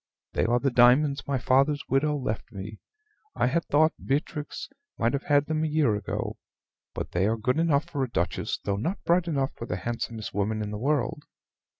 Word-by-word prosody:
They - - +1
are 120 +2 +3
the 135 +1 +1
diamonds 130 +4 +4
my 140 -1 +1
father's 135 +4 +2
widow 150 +2 +2
left 115 -5 -4
me. 105 +1 -7 0.6
I - - +2
had 165 +7 +1
thought 155 +2 +3
Beatrix 150 +2 -2 0.3
might 115 +2 +1
have 140 - -2
had 145 -1 +3
them 155 0 -1
a - - +1
year 150 -8 +2
ago; 105 -1 -4 0.6
but - - -4
they 90 +3 +2
are 115 +1 +1
good 125 +7 0
enough 155 -3 +2
for 145 -6 -2
a 130 - -2
duchess, 85 -6 -1
though 100 -1 -2
not 170 - -3
bright 175 +1 +2
enough 140 -4 0
for 115 - -7
the 90 - -2
handsomest 115 +2 -4
woman 105 +2 -1
in 105 - -4
the 105 - -4
world." 145 +1 0
135 Hz, 200 wpm, -27 LUFS, 110-150 Hz, 0.6 s, diamonds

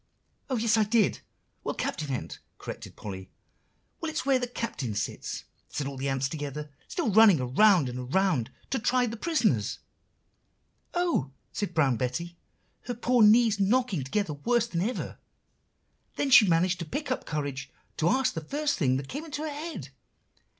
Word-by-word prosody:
"Oh, 260 - 0
yes, 225 0 +1
so 220 0 +5
I - - +3
did! 215 -1 +2 0.4
well, - - -2
Captain 150 -2 -3
Ant," 130 -3 -4 0.2
corrected - - -8
Polly. 95 -2 -7 0.7
"'Well, 330 - -3
it's 315 - -3
where 270 -2 +4
the 245 - -2
Captain 215 - -4
sits,' - - -4 0.3
said 145 - -3
the 135 0 -3
ants 135 0 0
all 135 - -2
together, 150 -1 -5 0.2
still 320 -11 -1
running 205 -5 +7
around 150 +6 +4
and 125 +1 -5
around, 185 -11 +2 0.2
'to 265 - +1
try 250 +3 +2
the 230 -1 -4
prisoners.' 325 +7 +1 1.2
"'Oh!' 345 - +1 0.2
said 200 -5 -3
Brown 135 -6 +3
Betty, 170 +9 -3 0.5
her 245 - -3
poor 245 +1 +2
knees 220 0 +6
knocking 200 - +2
together 165 +4 -1
worse 235 +11 +1
than 175 -8 -2
ever. 230 +7 -3 1.0
Then 275 - -1
she 225 -5 +9
managed 175 +2 +2
to 170 - -4
pick 285 - -4
up 255 - -2
courage 140 -3 -3 0.3
to 165 +1 +2
ask 265 +5 +2
the 160 - -4
first 290 - -1
thing 130 -5 +2
that 135 0 -5
came 290 - -5
into 300 -2 -5
her 310 -2 -3
head. 295 - -6
195 Hz, 170 wpm, -28 LUFS, -, 1.2 s, she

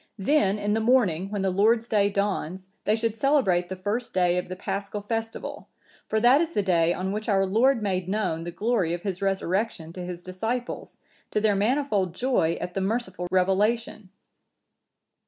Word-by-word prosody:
Then, 205 -2 +2
in 205 0 -1
the 220 - +1
morning, 215 -7 +2
when 205 -2 -2
the 190 - +1
Lord's 225 +5 +3
day 205 -3 +2
dawns, 190 -3 -2 0.2
they 210 - +3
should 225 -1 -1
celebrate 215 -10 +2
the 190 - -4
first 205 +6 -3
day 180 -1 +3
of 180 - -6
the 185 - -4
Paschal 200 +2 -4
festival; 225 +1 -4 0.4
for 220 - +1
that 250 +6 +5
is 335 0 -2
the 205 - +1
day 170 -3 +3
on 185 +2 -2
which 215 +2 -3
our 195 -1 +3
Lord 230 +5 +3
made 185 -2 -1
known 190 -6 -1
the 175 - -5
glory 185 -2 0
of 175 - -9
His 195 -2 -3
Resurrection 195 -3 -1
to 180 - -6
His 175 -1 -7
disciples, 225 +7 -4 0.3
to - - 0
their 210 -1 +3
manifold 210 - +1
joy 245 -10 +1
at 180 - -5
the 195 - -2
merciful 190 -3 -2
revelation. 200 +3 +1
200 Hz, 180 wpm, -26 LUFS, 185-225 Hz, 0.4 s, that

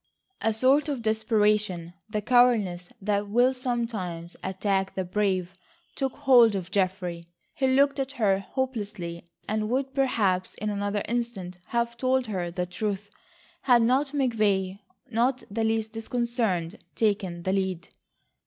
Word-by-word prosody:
A 225 - +2
sort 265 +7 +3
of 265 -5 -3
desperation, 210 -5 +1 0.2
the 210 -1 -2
cowardice 215 -8 +3
that 205 0 0
will 245 +4 +4
sometimes 225 -10 -3
attack 190 0 -1
the 190 - -1
brave 185 -1 0 0.4
took 270 -2 -1
hold 240 -5 +5
of 190 -1 -4
Geoffrey. 180 -3 -1 0.3
He 265 - +1
looked 275 +2 +3
at 270 0 -2
her 205 -7 +2
hopelessly 200 -8 -4 0.2
and 215 0 -1
would 265 +2 -1
perhaps 205 -9 +1
in 215 0 -3
another 205 0 -1
instant 225 -7 -3
have 235 0 -1
told 260 +1 +1
her 185 -6 -3
the 180 +1 -2
truth, 205 +2 -4 0.5
had 245 -3 +5
not 260 +5 +3
McVay, 215 -9 0 0.3
not 250 +3 +1
the 225 +2 -1
least 220 0 0
disconcerted, 225 -6 -2
taken 195 -5 0
the 190 - 0
lead. 190 -3 -2
215 Hz, 135 wpm, -27 LUFS, 190-245 Hz, 0.5 s, hold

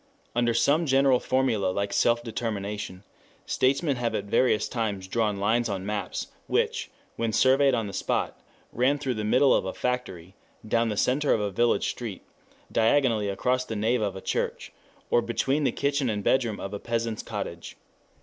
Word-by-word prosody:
Under 120 -1 +2
some 145 +8 +3
general 135 -1 +4
formula 125 -7 +1
like 100 +2 -1
self 120 0 +2
determination 105 -4 -4 0.4
statesmen 140 +2 +1
have 120 -1 -1
at 100 - -1
various 110 +2 +2
times 105 -6 -3
drawn 105 -1 0
lines 115 +4 +1
on 95 -2 -3
maps, 105 -2 -3 0.2
which, - - 0 0.3
when 115 -1 0
surveyed 135 +3 +4
on 115 -2 -1
the 100 - -7
spot, - - -2 0.3
ran 130 +4 +2
through 135 -3 -2
the 110 -2 -4
middle 130 +6 +4
of - - +2
a 95 - -5
factory, 95 -9 -3 0.3
down 115 +1 +2
the 105 - -3
center 140 +6 +2
of - - -1
a 105 -1 -1
village 120 +5 +2
street, 110 -6 -6 0.5
diagonally 115 -3 +2
across 125 +6 0
the 115 - -5
nave 110 +3 +1
of 100 -3 -1
a 95 - -7
church, - - -3 0.4
or 120 - +4
between 135 +5 0
the - - +3
kitchen 140 -2 0
and 105 -2 -2
bedroom 120 -4 +1
of 100 - -6
a 100 - -4
peasant's 115 -1 -2
cottage. 100 -6 -6
115 Hz, 175 wpm, -26 LUFS, 105-130 Hz, 0.5 s, general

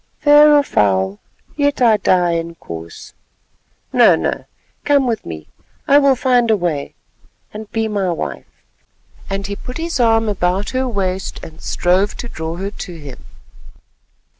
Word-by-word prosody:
"Fair 295 0 +6
or 290 -1 +5
foul, 95 - +1 0.4
yet 285 -1 0
I 230 -4 +5
die, 180 -3 +2
Inkoos." 165 - -7 0.8
"No, - - +6
no, - - -3 0.4
come 285 -2 +3
with 230 -3 -2
me—I 85 - -1
will 275 -2 +4
find 245 -2 +2
a 220 - +4
way—and 175 +5 -7
be 225 -1 -1
my 200 -3 -1
wife," 170 - -6 0.7
and 195 0 -3
he 200 0 -4
put 250 +4 -8
his 330 -3 -3
arm 225 -2 +3
about 195 0 -1
her 260 0 -1
waist, 190 -4 -3
and 160 +1 -11
strove 185 +3 0
to 240 - -6
draw 160 -6 -5
her 195 +3 -4
to 180 -4 -8
him. 145 -4 -11
200 Hz, 140 wpm, -18 LUFS, 170-250 Hz, 0.8 s, Fair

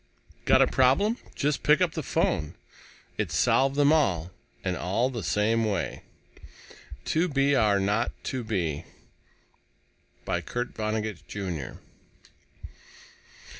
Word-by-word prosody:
Got - - +6
a - - +5
problem? 200 - +3 0.2
Just 145 0 0
pick 150 +3 +4
up 180 -3 +2
the 160 - -4
phone. 75 - -1 0.6
It - - -1
solved 135 +1 +3
them 145 +1 +4
all 95 - +1 0.3
and 90 -2 -1
all 110 +10 0
the 120 -3 -4
same 110 +3 +1
way! 100 -5 -2 1.0
2 165 +3 +1
B 140 -2 +2
R 105 -6 +3
0 105 +4 +1 0.2
2 130 -2 -3
B 85 -8 -2 1.4
by - - -1
KURT 120 0 -3
VONNEGUT, 110 -1 -3
JR. 90 -9 -5
115 Hz, 120 wpm, -27 LUFS, 100-140 Hz, 1.4 s, Got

